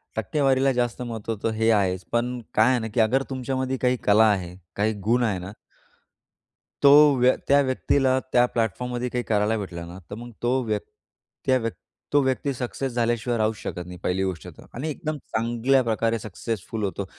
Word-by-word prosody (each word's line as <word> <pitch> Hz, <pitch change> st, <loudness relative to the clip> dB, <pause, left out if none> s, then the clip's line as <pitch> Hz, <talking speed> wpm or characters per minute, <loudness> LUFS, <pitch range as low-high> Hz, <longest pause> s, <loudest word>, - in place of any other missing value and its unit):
टक्केवारीला 135 Hz, +4 st, +2 dB
जास्त 120 Hz, 0 st, -1 dB
महत्व 115 Hz, -2 st, -4 dB
होत, 110 Hz, -3 st, -5 dB
हे 110 Hz, +1 st, +2 dB
आहेच. 95 Hz, -3 st, +1 dB
पण 120 Hz, +1 st, 0 dB
काय 110 Hz, +3 st, +4 dB
आहे 125 Hz, -, +2 dB
ना 110 Hz, -, -4 dB
की -, -, 0 dB
अगर 120 Hz, +5 st, +3 dB
तुमच्यामध्ये 130 Hz, 0 st, -2 dB
काही 125 Hz, 0 st, +2 dB
कला 105 Hz, +2 st, +5 dB
आहे, 90 Hz, -3 st, -3 dB, 0.2 s
काही 105 Hz, +2 st, +1 dB, 0.2 s
गुण 120 Hz, +1 st, +3 dB
आहे 100 Hz, -5 st, 0 dB
ना 90 Hz, +2 st, -7 dB, 1.3 s
तो 140 Hz, -, +8 dB, 0.3 s
व्य 125 Hz, +1 st, +5 dB
त्या 140 Hz, +1 st, +5 dB
व्यक्तीला 130 Hz, 0 st, +1 dB
त्या 125 Hz, 0 st, +6 dB
प्लॅटफॉर्ममध्ये 120 Hz, +2 st, -2 dB
काही 125 Hz, 0 st, -2 dB
करायला 105 Hz, +1 st, +1 dB
भेटलं 85 Hz, -5 st, -6 dB
ना, 85 Hz, +2 st, -9 dB
तर -, -, -6 dB
मग 120 Hz, +2 st, -9 dB
तो 120 Hz, -, +1 dB
व्यक् 105 Hz, -3 st, -2 dB, 0.6 s
त्या 130 Hz, -, +4 dB
व्यक् 115 Hz, -1 st, -3 dB, 0.4 s
तो 145 Hz, -, +5 dB
व्यक्ती 130 Hz, +1 st, 0 dB
सक्सेस 130 Hz, +1 st, -4 dB
झाल्याशिवाय 120 Hz, 0 st, 0 dB
राहूच 110 Hz, 0 st, +1 dB
शकत 90 Hz, -2 st, -6 dB
नाही 90 Hz, 0 st, -9 dB
पहिली 95 Hz, +1 st, 0 dB
गोष्ट 95 Hz, -4 st, -4 dB
तर. -, -, -12 dB
आणि 140 Hz, +7 st, -4 dB
एकदम 155 Hz, 0 st, -4 dB
चांगल्या 120 Hz, +2 st, +1 dB
प्रकारे 115 Hz, 0 st, 0 dB
सक्सेसफुल 110 Hz, +1 st, -5 dB
होतो. 100 Hz, 0 st, -2 dB
115 Hz, 180 wpm, -24 LUFS, 105-130 Hz, 1.3 s, तो